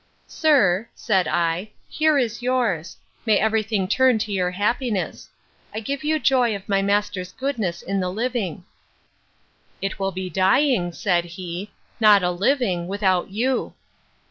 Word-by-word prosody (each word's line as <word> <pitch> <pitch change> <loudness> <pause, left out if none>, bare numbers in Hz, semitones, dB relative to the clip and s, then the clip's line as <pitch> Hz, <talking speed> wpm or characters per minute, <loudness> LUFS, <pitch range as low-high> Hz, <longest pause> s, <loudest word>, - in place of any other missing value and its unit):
—Sir, 230 - +2
said 190 -5 +1
I, 175 +4 0 0.2
here 310 -1 +2
is 235 -3 -1
yours: 240 -10 -1 0.3
May 220 -3 +3
every 220 +1 +2
thing 210 -3 -1
turn 255 +3 +3
to 215 -1 -3
your 185 -2 0
happiness! 210 +2 -2 0.5
I - - -1
give 275 +5 -4
you 310 +1 +1
joy 250 -6 +2
of 195 0 -9
my 195 -1 +2
master's 200 -2 -1
goodness 220 -11 -3
in 195 +1 -2
the 180 -1 -1
living.—It 195 -2 -7
will 195 0 -1
be 185 0 -4
dying, 190 +1 +2
said 175 -2 0
he, 175 +2 -7 0.3
not 210 -3 +6
a 180 - +2
living, 190 -3 0
without 190 -2 0
you. 245 +6 -1
205 Hz, 145 wpm, -23 LUFS, 185-240 Hz, 0.5 s, not